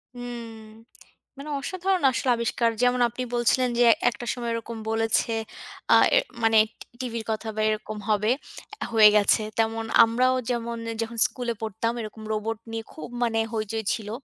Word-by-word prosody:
হুম। 245 -1 -7 0.9
মানে 280 +2 -8
অসাধারণ 370 +4 -1
আসলে 255 +1 -1
আবিষ্কার। 235 0 0
যেমন 250 0 +3
আপনি 240 +2 -5
বলছিলেন 245 +1 +2
যে, 245 - +6 0.2
একটা 240 +1 -8
সময় 240 -2 -4
এরকম 230 0 -5
বলেছে 225 +1 +1 0.6
আ - - +8 0.5
মানে 225 0 +4 0.2
টি - - -11 0.2
টিভির 230 -3 -4
কথা 220 +1 -4
বা 215 - -1
এরকম 215 0 -3
হবে, 210 +1 +2 0.6
হয়ে 215 -2 +8
গেছে। 210 +1 +4 0.2
তেমন 225 0 0 0.2
আমরাও 250 +3 +2
যেমন 235 -1 -2
এ - - -4
যখন 230 +1 -5
স্কুলে 245 -2 -4
পড়তাম, 220 +1 -2
এরকম 215 0 -8
রোবট 215 +1 -2
নিয়ে 225 0 -4
খুব - - -8 0.2
মানে 225 -1 +1
হৈচৈ 220 0 -2
ছিল। 210 -2 -5
230 Hz, 155 wpm, -25 LUFS, 220-245 Hz, 0.9 s, আ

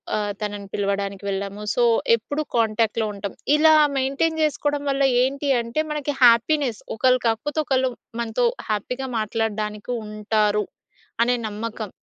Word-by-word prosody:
ఆహ్, 205 -1 -1
తనని 205 -1 -4
పిలవడానికి 200 0 -2
వెళ్ళాము. 200 +1 -4
సో, 245 - +3 0.3
ఎప్పుడు 285 +7 -4
కాంటాక్ట్‌లో 225 0 +1
ఉంటాం. 200 0 -6 0.2
ఇలా 315 +1 +6 0.2
మెయింటైన్ 280 +5 0
జేసుకోవడం 290 -1 0
వల్ల 275 0 +1 0.2
ఏంటి 275 +2 -1
అంటే 235 +6 -2
మనకి 295 -1 -2
హ్యాపీనెస్ 240 0 +4
ఒకళ్ళు 255 +2 +3
కాకపోతే 285 +8 -1
ఒకళ్ళు 260 -1 +1 0.3
మనతో 235 +1 0 0.2
హ్యాపీగా 250 +5 -2
మాట్లాడడానికి 215 0 -2
ఉంటారు 210 0 0 0.6
అనే 245 - +2
నమ్మకం. 215 -1 -5
230 Hz, 125 wpm, -23 LUFS, 210-270 Hz, 0.6 s, ఇలా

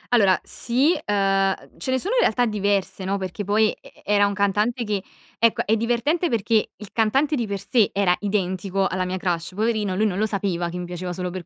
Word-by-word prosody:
Allora, 195 -5 +4
sì, 270 +8 +1
uhm, 205 - +1 0.4
uhm, - - -20
ce - - -5
ne 260 - +2
sono 400 - -2
in - - +3
realtà 245 +3 +3
diverse, 200 -3 -1
no, 195 +1 -1
perché 190 +2 -5
poi 215 +2 +3
e - - -18
era 205 0 +3
un 200 - -3
cantante 210 +4 +1
che 205 -3 -2 0.4
ecco, 230 0 +2
è 220 - +3
divertente, 245 +10 0
perché 225 -1 +1
il 210 -2 -11
cantante 270 +7 +2
di 235 -4 -2
per 200 0 -2
sé 220 +1 +2
era 190 -3 +2
identico 195 -1 -1
alla 185 -1 -1
mia 185 +1 -3
crush, 175 -1 -2
poverino, 215 -3 0
lui 215 +3 +2
non 195 -1 -1
lo 215 - +2
sapeva 185 -4 -2
che 180 - -6
mi 180 - -4
piaceva 180 0 -5
solo 180 0 -4
per 180 -2 -7
205 Hz, 220 wpm, -23 LUFS, 185-230 Hz, 0.4 s, Allora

